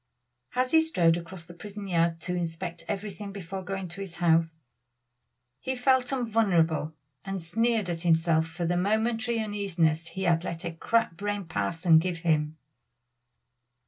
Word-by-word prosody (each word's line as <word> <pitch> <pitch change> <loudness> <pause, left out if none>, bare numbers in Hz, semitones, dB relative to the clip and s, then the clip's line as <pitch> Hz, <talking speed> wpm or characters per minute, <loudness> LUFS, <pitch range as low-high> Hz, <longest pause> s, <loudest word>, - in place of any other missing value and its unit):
As 255 0 +1
he 320 - +6
strode 175 - +3
across 170 0 -7
the 175 - -11
prison 205 +2 -8
yard 170 -2 +1
to 180 - -3
inspect 170 0 -4
everything 200 0 -4
before 195 -1 -6
going 190 0 -4
to 190 +4 -8
his 190 -3 -6
house, 165 -1 +3 1.0
he 260 - -3
felt 255 0 +2
invulnerable 190 - +1 0.3
and 195 0 -3
sneered 220 +4 +1
at 170 -2 -2
himself 165 -1 +3
for 170 +1 -4
the 175 +1 +1
momentary 225 +4 +1
uneasiness 180 -7 0
he 190 +3 -5
had 170 -2 +3
let 170 0 -5
a 170 - -2
crack 225 +2 +1
brained 205 -3 -3
parson 160 - +3
give 170 0 -2
him. 155 -2 +1
180 Hz, 150 wpm, -28 LUFS, 165-205 Hz, 1.0 s, he